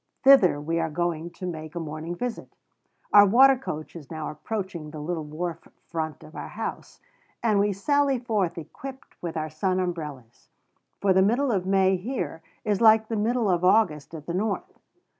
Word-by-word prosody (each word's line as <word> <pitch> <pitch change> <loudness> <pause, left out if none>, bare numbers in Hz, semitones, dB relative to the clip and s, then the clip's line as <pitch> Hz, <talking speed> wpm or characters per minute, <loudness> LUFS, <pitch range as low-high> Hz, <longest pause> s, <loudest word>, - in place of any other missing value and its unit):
Thither 265 - +7
we 165 +3 -1
are 165 0 0
going 170 +1 -2
to 185 - -9
make 155 -2 -6
a - - -2
morning 160 +2 -5
visit. 245 +5 -4 0.6
Our 205 0 +9
water 265 +6 +7
coach 155 - -6
is 150 -5 -10
now 155 -2 -4
approaching 175 -1 -5
the 155 0 -8
little 160 +1 -3
wharf 165 +3 -5 0.2
front 160 -2 -4
of 155 - -14
our - - -6
house: - - -6 0.4
and 215 -3 +3
we 205 +1 +2
sally 280 +7 +2
forth 210 -8 -1
equipped 265 - -10
with 170 -2 -4
our 155 0 -3
sun 185 +4 0
umbrellas; 150 -10 -5 0.5
for 195 -2 +3
the 190 - +5
middle 240 +7 +2
of 185 -4 -1
May 190 -1 +3
here 215 -4 -4 0.2
is 210 -1 0
like 220 -1 +6
the 225 - -1
middle 225 +2 +1
of 180 -2 +1
August 180 -6 +2
at 150 -2 -9
the 170 - -4
North. 220 - -2
180 Hz, 180 wpm, -26 LUFS, 160-220 Hz, 0.6 s, Our